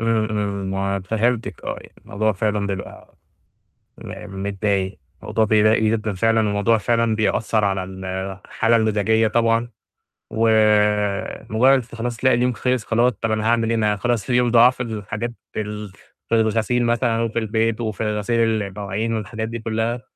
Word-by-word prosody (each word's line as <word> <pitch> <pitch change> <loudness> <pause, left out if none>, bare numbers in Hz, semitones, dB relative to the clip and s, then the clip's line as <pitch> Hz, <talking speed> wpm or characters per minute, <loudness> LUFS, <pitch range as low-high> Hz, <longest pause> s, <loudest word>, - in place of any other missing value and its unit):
امم، 115 -1 +1
امم، 100 -2 -2 0.3
م - - -4
فهمتِك 115 +4 -1
آه - - -3
يعني - - -16
الموضوع 110 +2 0
فعلًا 105 0 -1
بيبقى 100 -1 -7 0.9
م 95 -2 -8
متضايق، 100 -1 -1 0.3
الموضوع 110 - +1
بيضايق 110 +1 +3
جدًا 110 -1 0
فعلًا، 115 +4 +2
والموضوع 105 +3 +2
فعلًا 115 +1 +1
بيأثّر 110 0 +1
على 95 -1 0
الحالة 95 +4 -2
المزاجية 110 0 +2
طبعًا، 115 +1 +1 0.6
ومجرّد 110 +3 +2
خلاص 120 0 -5
تلاقي 130 +3 +3
اليوم 125 +1 +1
خلِص 125 0 -1
خلاص 120 +2 +2
طَب 115 +1 -3
أنا 110 0 0
هاعمل 115 -1 +2
إيه 115 - +1
أنا 105 -1 +1
خلاص 120 +2 -1
اليوم 125 -1 +3
ضاع 120 +1 +7
في 125 - -5
الحاجات 110 0 -4 0.2
ال 105 -2 -5 0.4
في - - -12
الغسيل 115 +2 +1
مثلًا 115 -1 +1
وفي 115 0 -1
البيت، 110 0 0
وفي 110 -1 -3
غسيل 115 0 +1
المواعين 100 +3 -3
والحاجات 110 +1 -4
دي 115 - -5
كلّها، 115 +2 -2
110 Hz, 150 wpm, -21 LUFS, 105-115 Hz, 0.9 s, ضاع